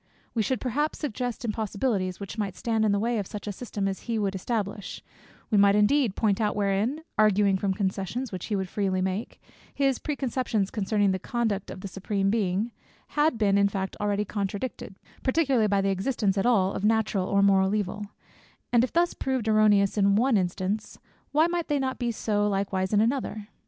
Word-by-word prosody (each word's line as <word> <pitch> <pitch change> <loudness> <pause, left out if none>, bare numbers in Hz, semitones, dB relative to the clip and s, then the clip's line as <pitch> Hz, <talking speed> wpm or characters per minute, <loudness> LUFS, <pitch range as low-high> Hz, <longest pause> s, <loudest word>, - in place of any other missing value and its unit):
We 230 - +1
should 255 +2 0
perhaps 285 +6 -1
suggest 245 -4 -3
impossibilities, 210 -3 -1
which 200 0 -6
might 200 -4 -3
stand 225 0 0
in 210 - +3
the 200 - +2
way 230 +2 0
of 200 - -4
such 210 - -7
a 210 - -3
system 205 -1 -4
as 195 -1 -3
he 230 - +1
would 200 -2 0
establish: 200 0 -3 0.5
we 210 - +4
might 200 0 +6
indeed 215 +1 +3
point 210 -2 +1
out 210 -1 +1
wherein 210 +9 0 0.2
(arguing 205 -2 +4
from 190 0 0
concessions 200 +5 -2
which 185 -2 -5
he 210 - -1
would 190 -1 -2
freely 190 -1 -1
make) 190 +4 -3 0.4
his 275 -3 +1
pre 300 - -3
conceptions 240 -7 -1
concerning 205 -1 +1
the 190 - -1
conduct 220 -3 -2
of 185 - -8
the 195 - -5
Supreme 195 +1 -1
Being, 210 +1 0 0.4
had 295 -4 +2
been 200 -2 +3
in 200 - +5
fact 190 -1 -3
already 205 0 0
contradicted, 200 +1 -4 0.3
particularly 260 -5 +2
by 200 -1 +2
the 195 - +1
existence 195 0 0
at 195 +3 +1
all 195 -6 +3
of - - -4
natural 215 -3 +1
or 200 0 +3
moral 195 0 +4
evil: 205 0 -3 0.7
and 235 0 +5
if 255 - -1
thus 345 +1 +2
proved 260 -4 -2
erroneous 210 -2 +4
in 200 0 +4
one 245 +3 +3
instance, 190 +2 -1 0.3
why 310 +2 +4
might 345 -1 -1
they 295 - +1
not 265 -1 -2
be 240 -2 0
so 210 -2 0
likewise 195 -1 -1
in 210 -1 +4
another? 225 -3 -1
210 Hz, 195 wpm, -27 LUFS, 195-235 Hz, 0.7 s, might